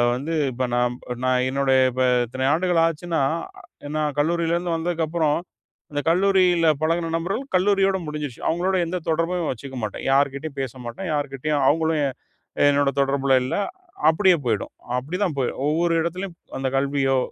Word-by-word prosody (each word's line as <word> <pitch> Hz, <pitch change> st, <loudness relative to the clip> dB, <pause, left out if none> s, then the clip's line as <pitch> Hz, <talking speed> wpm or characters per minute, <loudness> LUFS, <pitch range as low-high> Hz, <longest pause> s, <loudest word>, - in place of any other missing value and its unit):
வந்து 145 Hz, +6 st, -4 dB, 0.2 s
இப்ப 130 Hz, +1 st, -2 dB
நான் 120 Hz, 0 st, +1 dB, 0.3 s
நான் 130 Hz, 0 st, +2 dB
என்னுடைய 135 Hz, -1 st, +2 dB
இப்ப 130 Hz, +1 st, 0 dB, 0.2 s
இத்தனை 130 Hz, +3 st, -5 dB
ஆண்டுகள் 175 Hz, 0 st, +2 dB
ஆச்சுன்னா, 165 Hz, 0 st, -1 dB, 0.6 s
எ -, -, -6 dB
நான் 150 Hz, -2 st, -1 dB
கல்லூரியிலருந்து 170 Hz, +2 st, 0 dB
வந்ததுக்கப்புறம், 160 Hz, -2 st, 0 dB, 0.5 s
அந்த 145 Hz, 0 st, -1 dB
கல்லூரியில 180 Hz, -2 st, +3 dB
பழகின 165 Hz, +1 st, 0 dB
நண்பர்கள் 195 Hz, +10 st, -2 dB
கல்லூரியோட 195 Hz, 0 st, +3 dB
முடிஞ்சிருச்சு. 150 Hz, -5 st, -5 dB
அவங்களோட 180 Hz, +3 st, 0 dB
எந்த 180 Hz, -, -2 dB
தொடர்பும் 165 Hz, +1 st, 0 dB
வச்சுக்க 130 Hz, +2 st, -7 dB
மாட்டேன், 105 Hz, -, -4 dB
யார்கிட்டயும் 140 Hz, +1 st, 0 dB
பேச 130 Hz, -3 st, -4 dB
மாட்டேன், 175 Hz, +10 st, -5 dB
யார்கிட்டயும் 145 Hz, 0 st, -1 dB
அவங்களும் 160 Hz, 0 st, +1 dB
எ -, -, +1 dB, 0.6 s
என்னோட 140 Hz, -1 st, +2 dB
தொடர்புல 135 Hz, -1 st, +2 dB
இல்ல, 130 Hz, -, -2 dB, 0.6 s
அப்டியே 185 Hz, +1 st, +4 dB
போயிடும். 110 Hz, -3 st, -1 dB, 0.3 s
அப்டி 150 Hz, +8 st, -5 dB
தான் 155 Hz, -7 st, -3 dB
போய் 130 Hz, -, 0 dB, 0.2 s
ஒவ்வொரு 165 Hz, +3 st, +1 dB
எடத்திலும், 180 Hz, +2 st, -4 dB, 0.2 s
அந்த 135 Hz, 0 st, -1 dB
கல்வியோ, 135 Hz, -1 st, +1 dB
155 Hz, 145 wpm, -23 LUFS, 135-170 Hz, 0.6 s, அப்டியே